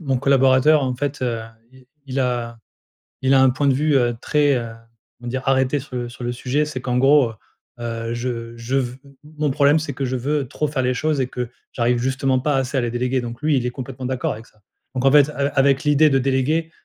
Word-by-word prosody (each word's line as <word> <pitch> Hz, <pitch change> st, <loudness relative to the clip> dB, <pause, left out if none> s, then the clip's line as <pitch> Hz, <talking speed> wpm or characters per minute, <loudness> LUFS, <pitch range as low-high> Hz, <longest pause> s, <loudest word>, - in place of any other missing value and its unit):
mon 135 Hz, -5 st, 0 dB
collaborateur 135 Hz, +2 st, +4 dB
en 130 Hz, -1 st, -1 dB
fait, 140 Hz, +1 st, -3 dB
heu, 115 Hz, -2 st, -1 dB, 0.3 s
il 130 Hz, -1 st, -19 dB, 0.2 s
il 135 Hz, +1 st, -3 dB
a 120 Hz, -2 st, -2 dB, 0.6 s
il 130 Hz, +1 st, +3 dB
a 135 Hz, -, +6 dB
un 130 Hz, -, +6 dB
point 140 Hz, +3 st, 0 dB
de 135 Hz, -, +4 dB
vue, 150 Hz, +1 st, +1 dB
heu, 120 Hz, -2 st, +2 dB
très, 145 Hz, -2 st, +2 dB
heu, 115 Hz, -2 st, -4 dB, 0.5 s
on 120 Hz, -, -12 dB
va -, -, -4 dB
dire 130 Hz, +1 st, -3 dB
arrêté 135 Hz, +1 st, +2 dB
sur 130 Hz, -1 st, -9 dB
le 120 Hz, -1 st, -3 dB
sur 120 Hz, 0 st, -10 dB
le 120 Hz, -, -1 dB
sujet. 130 Hz, +5 st, -1 dB
C'est 135 Hz, -4 st, -6 dB
qu'en 125 Hz, -1 st, -1 dB
gros, 135 Hz, -3 st, +4 dB, 0.5 s
heu, 115 Hz, 0 st, -4 dB
je 120 Hz, -1 st, -4 dB
je 115 Hz, +3 st, -3 dB
ve 125 Hz, -1 st, -2 dB
m 140 Hz, -, -17 dB, 0.3 s
mon 150 Hz, -2 st, +1 dB
problème 145 Hz, +2 st, +4 dB
c'est 145 Hz, -3 st, -4 dB
que 135 Hz, +1 st, -3 dB
je 130 Hz, +1 st, -2 dB
veux 140 Hz, +2 st, -1 dB
trop 150 Hz, +3 st, -2 dB
faire 140 Hz, -2 st, -2 dB
les 125 Hz, 0 st, +1 dB
choses 155 Hz, -1 st, 0 dB
et 125 Hz, -, -1 dB
que 125 Hz, -2 st, -5 dB, 0.2 s
j'arrive 120 Hz, 0 st, +1 dB
justement 130 Hz, +1 st, 0 dB
pas 145 Hz, +2 st, 0 dB
assez 135 Hz, +1 st, -1 dB
à -, -, +2 dB
les 120 Hz, -, -1 dB
déléguer 125 Hz, +1 st, -1 dB
donc 120 Hz, +2 st, -7 dB
lui, 150 Hz, -2 st, +2 dB
il 125 Hz, -, -1 dB
est -, -, 0 dB
complètement 130 Hz, 0 st, -7 dB
d'accord 130 Hz, 0 st, -1 dB
avec 110 Hz, +2 st, -10 dB
ça, 105 Hz, -, -28 dB, 0.3 s
donc 130 Hz, +1 st, -1 dB
en 135 Hz, -, +6 dB
fait, 145 Hz, 0 st, +6 dB
a 140 Hz, -1 st, -1 dB
avec 135 Hz, +1 st, +3 dB
l'idée 150 Hz, +1 st, +4 dB
de 135 Hz, -1 st, +2 dB
déléguer, 140 Hz, +5 st, 0 dB
130 Hz, 245 wpm, -21 LUFS, 125-140 Hz, 0.6 s, a